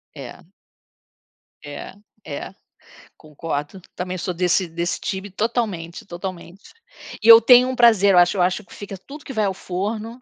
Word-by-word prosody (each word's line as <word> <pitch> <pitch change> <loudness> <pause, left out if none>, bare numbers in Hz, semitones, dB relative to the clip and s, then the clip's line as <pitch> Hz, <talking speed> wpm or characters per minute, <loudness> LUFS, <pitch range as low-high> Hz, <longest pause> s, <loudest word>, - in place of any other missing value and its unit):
É. - - -11 1.2
É, 145 +4 -8 0.3
é, 145 -2 -7 0.7
concordo, 155 +3 -6
também 185 0 -4
sou 180 +1 -4
desse 180 +1 +1
desse 170 +1 -3
time 190 +1 -5
totalmente, 200 -5 -3
totalmente. 180 0 -9 0.5
E - - 0
eu 230 0 +11
tenho 250 +2 +6
um 260 - -3
prazer 220 -5 +5
eu - - +4
acho 175 +2 +4
eu - - +1
acho 185 +3 0
que - - -17
fica 200 -1 -9
tudo 280 +11 -12
que 270 - -8
vai 215 -3 0
ao 195 - -1
forno, 215 +6 -5
190 Hz, 160 wpm, -21 LUFS, 175-220 Hz, 1.2 s, eu